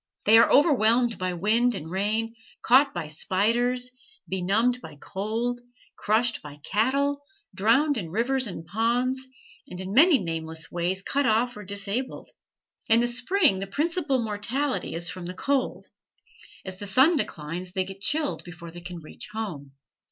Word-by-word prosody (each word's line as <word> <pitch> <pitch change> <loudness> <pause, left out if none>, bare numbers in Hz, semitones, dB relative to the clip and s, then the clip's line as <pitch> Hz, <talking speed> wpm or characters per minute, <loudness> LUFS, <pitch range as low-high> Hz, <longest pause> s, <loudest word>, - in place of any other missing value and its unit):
They 225 +2 +7
are 230 - +5
overwhelmed 240 -5 +4
by 185 0 -1
wind 230 +7 +2
and 160 +2 -6
rain, 215 +4 -1 0.3
caught 270 +4 +5
by 175 -3 -5
spiders, 235 +10 0 0.4
benumbed 215 +7 +1
by 160 -7 -10
cold, 225 +7 -3 0.3
crushed 230 +3 +1
by 145 0 -11
cattle, 280 - +1 0.3
drowned 230 +8 +3
in 170 -5 -6
rivers 245 +7 0
and 175 -4 -7
ponds, 245 +7 0 0.4
and 180 - -8
in 190 +1 -5
many 305 - +7
nameless 160 -4 -5
ways 180 +3 -1
cut 280 +3 0
off 235 +3 +2
or 210 - -8
disabled. 200 +6 -4 0.6
In 225 +1 +5
the 240 - +2
spring 250 - +2
the 195 - -4
principal 300 - 0
mortality 225 - -2
is 170 +1 -2
from 175 +1 -5
the 180 - -6
cold. 275 +4 -1 0.8
As 190 0 -7
the 205 - -6
sun 265 - +5
declines 175 - -4
they 190 -1 0
get 195 +1 -10
chilled 295 +6 0
before 170 -1 -10
they 175 +1 -10
can 175 -1 -8
reach 155 - -9
home. 160 -11 -5
220 Hz, 155 wpm, -26 LUFS, 185-250 Hz, 0.8 s, They